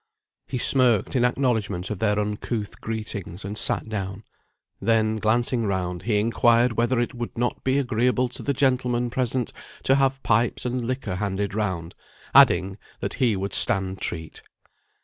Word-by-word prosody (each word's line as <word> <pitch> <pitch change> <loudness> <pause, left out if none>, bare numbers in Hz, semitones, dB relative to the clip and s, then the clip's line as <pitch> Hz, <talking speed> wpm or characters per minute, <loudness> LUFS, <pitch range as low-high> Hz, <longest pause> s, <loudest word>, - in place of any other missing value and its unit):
He 130 - -3
smirked 125 -3 +2
in 125 - +3
acknowledgment 115 -7 0
of 105 - -4
their 105 -1 +1
uncouth 105 +1 -3
greetings, 105 -4 -5
and 100 +1 -5
sat 105 - +1
down; 100 -1 -5 0.6
then 110 -1 +2
glancing 115 +1 +1
round, 90 -2 -2
he 105 0 +1
inquired 115 +2 +3
whether 120 +2 +1
it 120 - -1
would 120 -1 -6
not 120 +1 -2
be 130 +1 +1
agreeable 125 -1 +1
to 125 - -8
the 140 - -1
gentlemen 125 -2 +1
present 125 -1 -1 0.3
to 135 - +3
have 135 -1 +1
pipes 115 +2 +1
and 125 0 -2
liquor 125 -8 -3
handed 100 0 -2
round; 95 -6 -3 0.4
adding, 95 +2 +5 0.2
that - - -3
he 120 -5 +3
would 95 +1 -4
stand 95 -1 +3
treat. 80 -1 -4
115 Hz, 155 wpm, -24 LUFS, 100-125 Hz, 0.6 s, adding